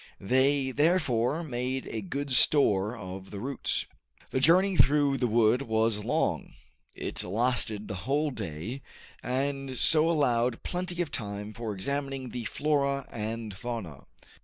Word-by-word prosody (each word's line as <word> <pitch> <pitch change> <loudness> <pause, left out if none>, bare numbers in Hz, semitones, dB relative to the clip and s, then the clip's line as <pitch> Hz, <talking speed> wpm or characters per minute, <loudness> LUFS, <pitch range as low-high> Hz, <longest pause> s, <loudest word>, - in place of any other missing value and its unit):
They 130 +5 +2
therefore 145 -2 +2
made 130 -2 -3
a 110 - -4
good 140 +8 -4
store 115 -5 +3
of 95 -1 -8
the 100 - -7
roots. 135 +4 -2 0.5
The - - +1
journey 180 +7 +5
through 145 -2 +4
the 125 - +2
wood 115 +2 +3
was 110 -3 0
long; - - -1 0.4
it - - -3
lasted 110 +1 0
the 105 - -4 0.2
whole 150 +2 +2
day, 105 - -5 0.4
and 135 +1 -2
so 160 +4 +4
allowed 125 -7 +1
plenty 180 -1 -2
of 150 - -9
time 105 -2 -5
for 115 -1 -4
examining 135 +5 -3
the 120 -2 -5
flora 140 0 0
and 110 -1 -4
fauna. 110 - -6
125 Hz, 135 wpm, -29 LUFS, 110-140 Hz, 0.5 s, journey